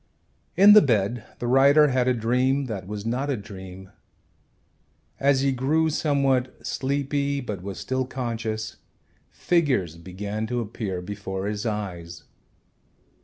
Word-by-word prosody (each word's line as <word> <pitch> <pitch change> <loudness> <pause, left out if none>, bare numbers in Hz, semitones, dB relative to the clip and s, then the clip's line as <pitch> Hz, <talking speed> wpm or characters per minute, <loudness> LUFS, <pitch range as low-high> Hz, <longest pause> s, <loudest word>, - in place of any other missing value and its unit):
In 200 +3 +9
the 215 - +9
bed 115 - 0
the - - -5
writer 140 +4 +5
had 130 -1 +1
a 125 - +3
dream 125 +4 +1
that 100 -6 -6
was 105 0 -6
not 130 +5 -1
a 135 - 0
dream. 95 -2 -10 1.3
As 135 -1 +3
he 135 0 +2
grew 155 +5 +1
somewhat 135 -4 0
sleepy 140 +1 -1
but 105 -8 -5
was 95 0 -6
still 130 0 -2
conscious, 115 -4 -4 0.5
figures 130 - 0
began 100 +5 -5
to 125 +1 -2
appear 100 -5 -4
before 95 -1 -5
his 105 +2 -3
eyes. 85 -6 -5
120 Hz, 130 wpm, -25 LUFS, 100-135 Hz, 1.3 s, In